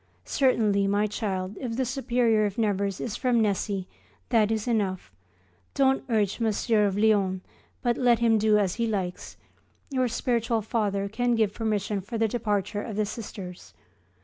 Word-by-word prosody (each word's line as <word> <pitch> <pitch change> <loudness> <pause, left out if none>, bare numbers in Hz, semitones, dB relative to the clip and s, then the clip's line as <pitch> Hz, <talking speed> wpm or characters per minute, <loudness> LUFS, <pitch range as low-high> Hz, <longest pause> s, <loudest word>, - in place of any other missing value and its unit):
Certainly, 215 -7 +2
my 205 +1 +2
child, 195 -2 -3
if 235 -3 -4
the 260 - +1
Superior 240 -4 +1
of 200 - -7
Nevers 200 -3 0
is 225 - -4
from 250 -2 +1
Nessy 200 -2 0 0.4
that 215 -2 +3
is 220 +1 -1
enough. 195 - -1 0.6
Don't 270 -1 +3
urge 210 -3 +1
Mgr. 220 -1 +2
of 195 0 -2
Lyons, 200 -3 +2 0.4
but 240 -2 +1
let 245 -2 +4
him 225 -1 +3
do 215 0 +4
as 195 -4 +1
he 230 - +2
likes. 190 -5 -4 0.5
Your 255 -2 +1
spiritual 230 -1 0
Father 200 -3 -1
can 240 +3 0
give 215 -3 +1
permission 210 -2 -1
for 225 +5 -5
the 225 0 +2
departure 205 -2 -1
of 215 -1 -6
the 215 0 +1
Sisters. 200 -4 -8
215 Hz, 160 wpm, -26 LUFS, 200-235 Hz, 0.6 s, let